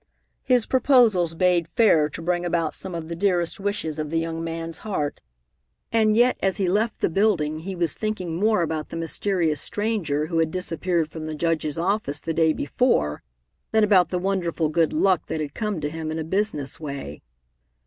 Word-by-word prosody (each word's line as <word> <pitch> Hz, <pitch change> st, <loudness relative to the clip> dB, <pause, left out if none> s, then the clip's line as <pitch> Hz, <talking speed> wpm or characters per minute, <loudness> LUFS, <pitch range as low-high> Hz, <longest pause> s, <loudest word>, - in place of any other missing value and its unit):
His 250 Hz, -3 st, +2 dB
proposals 230 Hz, -, +3 dB
bade 175 Hz, -1 st, +2 dB
fair 170 Hz, -8 st, +3 dB
to 165 Hz, -, -8 dB
bring 175 Hz, 0 st, 0 dB
about 165 Hz, -3 st, 0 dB
some 185 Hz, -2 st, -4 dB
of 165 Hz, -1 st, -5 dB
the 170 Hz, -, -5 dB
dearest 175 Hz, -2 st, 0 dB
wishes 195 Hz, -6 st, -2 dB
of 150 Hz, -1 st, -3 dB
the 165 Hz, -, -1 dB
young 165 Hz, 0 st, -2 dB
man's 165 Hz, 0 st, -5 dB
heart, 170 Hz, -9 st, -3 dB, 0.7 s
and 220 Hz, -1 st, +3 dB
yet 245 Hz, +2 st, +3 dB
as 195 Hz, -1 st, +1 dB
he 195 Hz, -3 st, 0 dB
left 210 Hz, +5 st, 0 dB
the -, -, +3 dB
building 165 Hz, -5 st, +1 dB
he 190 Hz, +4 st, -6 dB
was 170 Hz, -2 st, +1 dB
thinking 190 Hz, -6 st, -3 dB
more 210 Hz, 0 st, +2 dB
about 155 Hz, -1 st, -3 dB
the -, -, -7 dB
mysterious 165 Hz, -1 st, 0 dB
stranger 200 Hz, -9 st, -1 dB
who 165 Hz, 0 st, -1 dB
had 160 Hz, -1 st, +2 dB
disappeared 170 Hz, -1 st, -1 dB
from 155 Hz, 0 st, -7 dB
the 155 Hz, -, -4 dB
Judge's 155 Hz, -2 st, -1 dB
office 175 Hz, -4 st, 0 dB
the 165 Hz, -, -3 dB
day 160 Hz, 0 st, +3 dB
before 145 Hz, -, 0 dB, 0.5 s
than 220 Hz, 0 st, +3 dB
about 190 Hz, -5 st, +4 dB
the 180 Hz, -, -1 dB
wonderful 175 Hz, -4 st, -1 dB
good 165 Hz, +1 st, +2 dB
luck 195 Hz, -, +2 dB
that 160 Hz, -, -3 dB
had 150 Hz, -2 st, -4 dB
come 210 Hz, -5 st, -2 dB
to 145 Hz, -, -2 dB
him 160 Hz, 0 st, -5 dB
in 160 Hz, -, -3 dB
a 160 Hz, -, -2 dB
business 160 Hz, -5 st, -1 dB
way. 140 Hz, -, -6 dB
170 Hz, 190 wpm, -24 LUFS, 160-200 Hz, 0.7 s, about